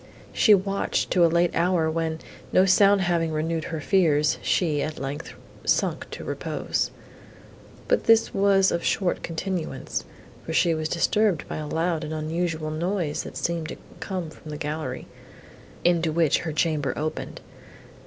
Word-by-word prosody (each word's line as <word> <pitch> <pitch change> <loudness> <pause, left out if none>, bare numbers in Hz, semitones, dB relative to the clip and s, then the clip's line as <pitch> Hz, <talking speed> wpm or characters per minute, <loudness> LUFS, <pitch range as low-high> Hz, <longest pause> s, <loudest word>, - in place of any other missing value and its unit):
She 215 -3 +6
watched 195 +1 -1
to 180 - +4
a - - +7
late 170 +1 +2
hour, 170 -1 +2
when, 160 0 -1 0.3
no 185 - +5
sound 195 +1 +5
having 170 -3 +1
renewed 160 +1 -1
her 160 - -4
fears, 155 -3 +2
she, 155 -5 +1
at 155 +1 -3
length, 140 +3 -5 0.3
sunk - - 0
to - - -7
repose. - - -2 1.0
But - - +1
this 225 0 +4
was 195 -1 +4
of 170 - -1
short 185 -3 0
continuance, 170 0 -3 0.4
for 160 - -5
she 170 0 +3
was 155 0 -2
disturbed 190 +2 +1
by - - -5
a 155 -1 -4
loud 165 +1 -1
and 155 +1 -4
unusual 160 0 -2
noise, 170 -1 -1
that - - -8
seemed 170 -2 -2
to - - -6 0.2
come 180 -5 -4
from 155 - -13
the 150 - -5
gallery, 150 -4 -4 0.8
into 170 -2 +2
which 160 -2 +2
her 165 - -4
chamber 155 -2 0
opened. 155 +1 -4
165 Hz, 155 wpm, -25 LUFS, 155-180 Hz, 1.0 s, a